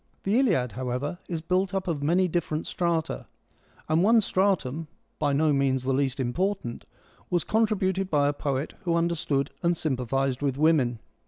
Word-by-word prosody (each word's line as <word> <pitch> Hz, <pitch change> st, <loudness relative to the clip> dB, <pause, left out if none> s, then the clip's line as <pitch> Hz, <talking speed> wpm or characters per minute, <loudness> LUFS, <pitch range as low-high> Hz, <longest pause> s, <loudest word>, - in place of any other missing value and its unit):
The 205 Hz, +5 st, +2 dB
Iliad 170 Hz, -, +2 dB
however, 130 Hz, +7 st, -3 dB
is 165 Hz, -3 st, -3 dB
built 185 Hz, +3 st, 0 dB
up 190 Hz, -1 st, -2 dB
of 160 Hz, -5 st, -1 dB
many 175 Hz, +6 st, +3 dB
different 165 Hz, -2 st, -2 dB
strata, 170 Hz, -3 st, -1 dB, 0.6 s
and 160 Hz, +2 st, +2 dB
one 225 Hz, +4 st, +5 dB
stratum 180 Hz, -7 st, 0 dB, 0.2 s
— -, -, -45 dB
by 145 Hz, -2 st, +1 dB
no 150 Hz, +2 st, +3 dB
means 135 Hz, -2 st, +1 dB
the 135 Hz, +1 st, 0 dB
least 135 Hz, 0 st, 0 dB
important 130 Hz, +1 st, -2 dB, 0.2 s
— -, -, -30 dB
was 175 Hz, -2 st, +1 dB
contributed 195 Hz, -4 st, +1 dB
by 145 Hz, -3 st, +3 dB
a 145 Hz, -, +1 dB
poet 140 Hz, 0 st, -2 dB
who 170 Hz, -2 st, 0 dB
under 170 Hz, 0 st, +2 dB
stood 140 Hz, -4 st, -1 dB
and 170 Hz, -1 st, +1 dB
sympathised 135 Hz, -2 st, -1 dB
with 140 Hz, -2 st, 0 dB
women. 145 Hz, -6 st, +3 dB
155 Hz, 175 wpm, -27 LUFS, 135-180 Hz, 0.6 s, one